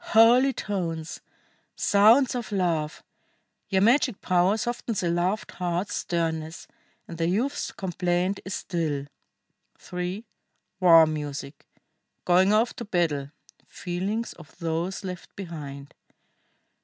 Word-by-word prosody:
Holy 240 +4 +7
tones! 175 -8 -4 0.5
Sounds 225 +6 +5
of 240 -3 -4
love! 170 -6 -1 0.7
Your 190 0 +2
magic 245 -1 +3
power 185 +3 +2
softens 235 -2 -2
the 175 -2 0
loved 180 +5 -1
heart's 180 +2 -2
sternness, 160 -1 -3 0.4
and 165 - -9
the 165 - +1
youth's 260 +10 -1
complaint 180 +1 -1
is 190 - -4
still." 155 -6 -2 0.9
[III. 180 +5 -3 0.5
WAR 165 -3 +8
MUSIC. 145 -2 -5 0.6
GOING 185 +2 +4
OFF 220 +3 +2
TO - - -6
BATTLE. 160 -8 0 0.4
FEELINGS 195 +6 -3
OF 160 -4 -15
THOSE 170 +4 -2
LEFT 180 -2 -7
BEHIND. 145 -7 -8
180 Hz, 110 wpm, -26 LUFS, 165-205 Hz, 0.9 s, WAR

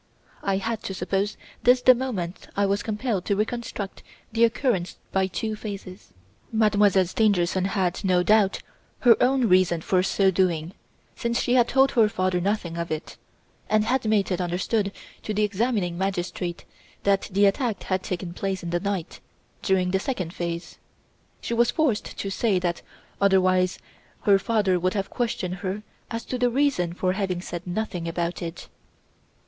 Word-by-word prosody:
I 195 -1 0
had 225 +2 -2
to 190 - -4
suppose 195 +3 -1 0.2
this 250 +1 +5
the 255 - +9
moment 215 -9 -4
I 200 - +3
was 200 +1 +1
compelled 215 -3 -2
to 200 - +1
reconstruct 215 -1 -3 0.3
the 230 +1 +2
occurrence 230 -6 0
by 190 -1 +2
two 215 +3 -3
phases. 200 -3 -8 0.4
Mademoiselle 210 -3 +4
Stangerson 185 -2 +1
had, 190 -1 -1
no 180 -2 +3
doubt, 210 -1 +3 0.4
her 240 -3 +7
own 255 -1 +3
reasons 180 -3 +3
for 185 -1 +3
so 195 +1 +2
doing, 175 -2 0 0.4
since 235 0 -1
she 245 - +1
had 245 -2 +5
told 270 0 +4
her 225 -4 +4
father 185 -2 0
nothing 180 -3 -1
of 170 0 -3
it, 155 0 -5 0.5
and 215 0 +3
had 255 +4 +1
made 210 -3 +2
it 180 0 0
understood 195 +4 0 0.3
to 215 - -4
the 210 - +2
examining 205 -4 0
magistrate 180 -2 -3 0.4
that 200 -1 +2
the 200 +2 +4
attack 220 +2 0
had 185 -1 -1
taken 175 -2 -4
place 190 0 -3
in 170 - -4
the 175 - +1
night, 195 -2 -3 0.4
during 185 -2 +1
the 190 - +2
second 190 -8 -3
phase. 170 0 -5 0.6
She - - -3
was 235 0 +3
forced 290 -10 0
to 195 - -3
say 205 -1 +1
that, 175 -1 -1 0.4
otherwise 185 -2 +3 0.4
her 200 -1 +5
father 200 -5 +1
would 185 +3 0
have 195 -1 -2
questioned 190 -6 -2
her 195 +2 -4 0.3
as 230 -1 -4
to 255 - -3
her 245 0 +3
reason 240 -10 +1
for 185 +1 0
having 190 -2 -1
said 175 0 -6
nothing 180 -2 -3
about 170 +1 -2
it. 170 -1 -6
195 Hz, 165 wpm, -25 LUFS, 180-220 Hz, 0.6 s, the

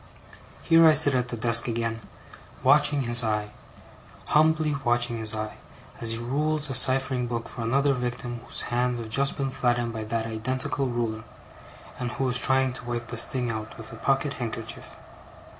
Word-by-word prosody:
Here 165 -1 +5
I 155 - +7
sit 145 -2 +6
at 125 -1 0
the 120 - -5
desk 115 +1 +3
again, 115 -1 -3 0.6
watching 145 -2 +4
his 120 0 +3
eye 105 -1 -2 0.8
humbly 155 -1 +3
watching 120 -1 +1
his 110 0 +2
eye, 110 0 -5 0.4
as 115 -1 -3
he - - -4
rules 145 +4 -2
a - - -2
ciphering 130 -1 +3
book 115 -1 -4
for - - -8
another 135 +5 +1
victim 120 -1 -4
whose - - -1
hands 125 0 0
have 115 -2 -7
just 135 +5 0
been 135 -1 -2
flattened 120 -2 -1
by 110 -1 -5
that 115 +1 -2
identical 130 +4 -2
ruler, 115 -3 -3 0.8
and 125 -1 -4
who 135 - -1
is 125 0 +3
trying 130 0 +2
to 125 - -9
wipe 120 -1 -4
the 120 - -3
sting 125 +1 +1
out 110 -1 -7
with 110 - -10
a - - -9
pocket 135 +4 0
handkerchief. 115 -1 -6
120 Hz, 175 wpm, -25 LUFS, 115-135 Hz, 0.8 s, I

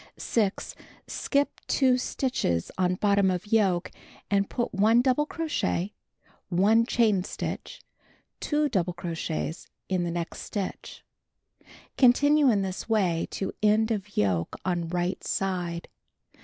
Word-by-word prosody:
6. 210 -4 -1 0.3
Skip 285 0 -1
2 260 -2 +3
stitches 245 - -1
on 180 -1 +1
bottom 200 0 +3
of 180 0 -2
yoke, 200 -5 +1 0.4
and 200 0 +2
put 240 -2 -2
1 220 +5 +4
double 275 +3 +2
crochet, 295 - -2 0.6
1 210 +6 +3
chain 215 -7 +2
stitch, - - -6 0.6
2 300 0 +1
double 185 -9 0
crochets 165 -1 -4 0.2
in 185 -2 +1
the 175 - -1
next 170 0 -4
stitch. 200 -3 -6 0.9
Continue 285 +3 +5
in 205 -4 +2
this 190 +3 -5
way 185 -7 +1
to 195 - -4
end 215 +2 +3
of 205 -1 -4
yoke 90 -5 +1
on 175 -2 -1
right 175 +1 -2
side. 175 -3 -2
195 Hz, 125 wpm, -27 LUFS, 175-230 Hz, 0.9 s, Continue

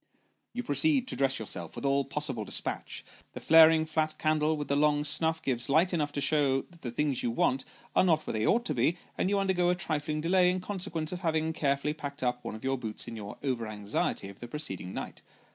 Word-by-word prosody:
You 245 - -3
proceed 275 0 +2
to - - -2
dress 135 -1 +2
yourself, 90 -6 -4
with - - -6
all 140 0 +2
possible 135 -5 -2
despatch. - - -4 0.3
Tho - - -6
flaring 160 0 +6
flat 155 0 -1
candle 155 0 +1
with 145 - -4
the 140 - +1
long 150 0 +3
snuff, 160 +2 +1
gives 125 0 -1
light 165 +6 +3
enough 150 -4 0
to - - -2
show 140 -2 +2
that 170 -2 -20
the 125 - -4
things 140 +2 0
you 120 - 0
want 130 +3 +1 0.3
are - - +5
not 160 -4 +2
where - - -3
they 110 0 0
ought 235 +2 +2
to 150 - -1
be, 140 +7 +1 0.2
and 185 - 0
you 200 - +2
undergo 190 -3 +2
a 180 - +2
trifling 155 -3 -2
delay 180 +3 +3
in 185 +1 0
consequence 180 -4 -4
of 180 - -4
having 160 -2 0
carefully 140 0 0
packed 145 -2 -6
up 125 0 -1
one - - -5
of 110 - -10
your 135 0 -1
boots 110 -3 -6
in 115 - -6
your 105 -2 -8
over 125 -5 -1
anxiety 105 -1 -2
of 100 0 -12
the 120 - -7
preceding 120 - -4
night. - - -7
150 Hz, 230 wpm, -29 LUFS, 130-160 Hz, 0.3 s, flaring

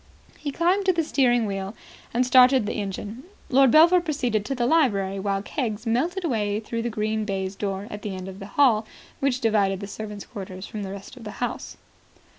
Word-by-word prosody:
He 295 - -3
climbed 360 +7 +1
to 370 - +5
the 335 -1 +1
steering 245 -6 +2
wheel, 195 +1 -4 0.4
and 245 +2 +1
started 255 -1 +6
the - - -2
engine. 205 +3 -5 0.3
Lord 270 0 +5
Belpher 335 +6 +6
proceeded 255 -10 -1
to 270 - -2
the 240 -1 0
library, 200 -10 +2
while 195 0 -1
Keggs 230 -4 -3
melted 330 +12 0
away 210 -7 0
through 230 +1 -4
the 240 - -2
green 215 0 -1
baize 195 -2 -3
door 195 -1 -3
at 205 - -6
the 200 -3 -4
end 185 0 -7
of 190 0 -8
the 195 - -8
hall 230 -6 +4 0.3
which 270 -2 0
divided 200 -4 +2
the 200 - -5
servants' 210 0 -7
quarters 190 -4 -8
from 215 - -6
the 195 - -5
rest 195 +6 -9
of 245 - -11
the 210 - -7
house. 245 - -4
220 Hz, 205 wpm, -25 LUFS, 200-260 Hz, 0.4 s, started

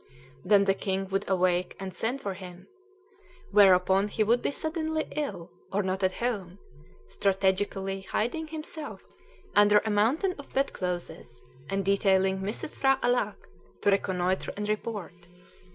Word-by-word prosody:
Then 200 +1 +5
the 195 -1 +3
king 195 0 -2
would 195 0 -2
awake 180 -1 +1
and 190 -1 -5
send 250 +5 -2
for 200 - -3
him, 180 -1 -11 0.8
whereupon 195 -1 +5
he 215 +1 0
would 235 +3 +3
be - - 0
suddenly 315 +1 -2
ill, 275 - -4 0.2
or 205 +1 +1
not 190 +1 -2
at 185 -1 +1
home, 200 -7 -3 0.5
strategically 195 0 0
hiding 245 +11 -2
himself 310 -1 -7 0.5
under 205 0 +6
a 220 - 0
mountain 255 - +2
of 285 - -11
bedclothes, 175 - -3 0.3
and 195 -1 -1
detailing 190 -1 +3
Mrs. 205 +9 -5
P'hra 270 0 +3
Alâck 245 -4 +1 0.5
to 205 - +3
reconnoitre 185 -1 0
and 210 0 -3
report. 205 -5 -4
195 Hz, 135 wpm, -28 LUFS, 190-230 Hz, 0.8 s, under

